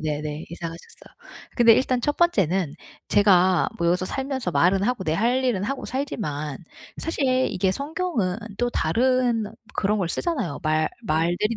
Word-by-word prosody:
네네네. 150 Hz, 0 st, -3 dB
이사 170 Hz, 0 st, -5 dB
가셨어요. 165 Hz, +1 st, -13 dB, 0.4 s
근데 235 Hz, -2 st, +7 dB
일단 255 Hz, 0 st, +1 dB
1 295 Hz, +4 st, -1 dB
번째는 190 Hz, -, +2 dB, 0.3 s
제가 185 Hz, -3 st, +4 dB
뭐 170 Hz, -, 0 dB
여기서 180 Hz, +2 st, +1 dB
살면서 265 Hz, -3 st, -3 dB
말은 180 Hz, +7 st, +3 dB
하고 235 Hz, -3 st, 0 dB
내 155 Hz, -, 0 dB
할 245 Hz, +6 st, +1 dB
일은 205 Hz, -6 st, 0 dB
하고 275 Hz, +4 st, -3 dB
살지만 155 Hz, -, -3 dB, 0.4 s
사실 320 Hz, -4 st, -2 dB, 0.3 s
이게 185 Hz, +1 st, 0 dB
성경은 280 Hz, -, -2 dB, 0.2 s
또 245 Hz, 0 st, +1 dB
다른 240 Hz, +5 st, +1 dB, 0.3 s
그런 210 Hz, +2 st, +1 dB
걸 180 Hz, -3 st, -1 dB
쓰잖아요. 270 Hz, -, -2 dB
말 155 Hz, 0 st, +1 dB
말들이 175 Hz, +5 st, 0 dB
200 Hz, 305 characters per minute, -24 LUFS, 170-255 Hz, 0.4 s, 근데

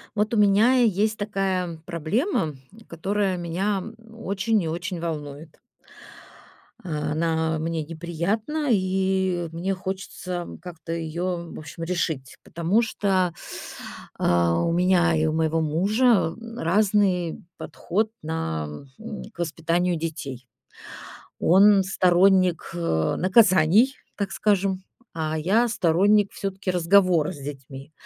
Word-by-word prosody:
Вот 210 Hz, +2 st, 0 dB
у -, -, +2 dB
меня 210 Hz, +5 st, +5 dB
есть 215 Hz, -1 st, +2 dB
такая 190 Hz, -5 st, -2 dB
проблема, 170 Hz, -, -1 dB, 0.3 s
которая 195 Hz, +3 st, -1 dB
меня 180 Hz, +3 st, -2 dB, 0.3 s
очень 215 Hz, 0 st, -1 dB
и -, -, -3 dB
очень 175 Hz, +1 st, -4 dB
волнует. 150 Hz, -2 st, -6 dB, 1.2 s
Она 160 Hz, 0 st, -1 dB
мне 160 Hz, 0 st, -2 dB
неприятна, 175 Hz, -, -3 dB
и 190 Hz, -3 st, +1 dB
мне 175 Hz, +4 st, -2 dB
хочется 185 Hz, -1 st, -5 dB, 0.2 s
как-то 170 Hz, -2 st, -9 dB
её, 170 Hz, +1 st, -3 dB
в -, -, -8 dB
общем, 155 Hz, +2 st, -8 dB
решить, 165 Hz, -6 st, -3 dB
потому 170 Hz, +7 st, +1 dB
что, 190 Hz, -5 st, 0 dB, 0.9 s
а, 85 Hz, -1 st, +2 dB
у -, -, +1 dB
меня 175 Hz, -1 st, +3 dB
и 155 Hz, -, +1 dB
у 155 Hz, -, 0 dB
моего 160 Hz, 0 st, +1 dB
мужа 195 Hz, +4 st, +2 dB, 0.2 s
разный 190 Hz, -3 st, +1 dB
подход 215 Hz, +5 st, -2 dB
на 80 Hz, -, -3 dB, 0.6 s
к -, -, -22 dB
воспитанию 170 Hz, +2 st, 0 dB
детей. 150 Hz, -6 st, -5 dB, 0.9 s
Он 195 Hz, +2 st, +6 dB
сторонник, 185 Hz, -1 st, +3 dB
э, 80 Hz, -, 0 dB
наказаний, 190 Hz, -, +4 dB, 0.2 s
так 200 Hz, -2 st, -3 dB
скажем, 195 Hz, -2 st, +1 dB, 0.3 s
а 160 Hz, -1 st, -2 dB
я 205 Hz, +10 st, +2 dB
сторонник 205 Hz, +1 st, +3 dB
всё-таки 195 Hz, 0 st, -4 dB
разговора 180 Hz, -2 st, +3 dB
с -, -, -11 dB
детьми, 135 Hz, +1 st, -9 dB
180 Hz, 110 wpm, -24 LUFS, 160-195 Hz, 1.2 s, Он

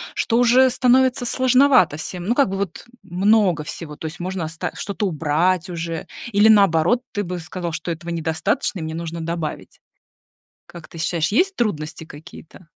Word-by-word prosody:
что 230 Hz, -, 0 dB
уже 245 Hz, +2 st, +5 dB
становится 255 Hz, 0 st, +2 dB
сложновато 255 Hz, -, +4 dB
всем. 175 Hz, +3 st, -6 dB
Ну 235 Hz, +5 st, +1 dB
как 280 Hz, -9 st, +3 dB
бы 195 Hz, -, -3 dB
вот 195 Hz, 0 st, -5 dB, 0.2 s
много 190 Hz, -2 st, +2 dB
всего, 150 Hz, 0 st, -7 dB
то 160 Hz, -, -6 dB
есть 155 Hz, -, -8 dB
можно 185 Hz, 0 st, -4 dB
оста 160 Hz, +1 st, -4 dB
что-то 200 Hz, 0 st, -3 dB
убрать 165 Hz, +3 st, 0 dB
уже 165 Hz, -2 st, -5 dB, 0.3 s
или 205 Hz, +2 st, +5 dB
наоборот, 200 Hz, +2 st, +4 dB
ты 205 Hz, -1 st, -1 dB
бы 180 Hz, 0 st, -5 dB
сказал, 175 Hz, 0 st, -5 dB
что 165 Hz, +1 st, -5 dB
этого 170 Hz, +1 st, -5 dB
недостаточно 160 Hz, +3 st, -1 dB
и -, -, -6 dB
мне 160 Hz, 0 st, -5 dB
нужно 165 Hz, 0 st, -5 dB
добавить. 165 Hz, -2 st, -5 dB, 0.9 s
Как 170 Hz, -2 st, -12 dB
ты 165 Hz, -, -12 dB
считаешь, 165 Hz, 0 st, 0 dB
есть 370 Hz, -, +1 dB
трудности 160 Hz, -, -3 dB
какие-то? 160 Hz, +3 st, -13 dB
175 Hz, 170 wpm, -21 LUFS, 160-220 Hz, 0.9 s, уже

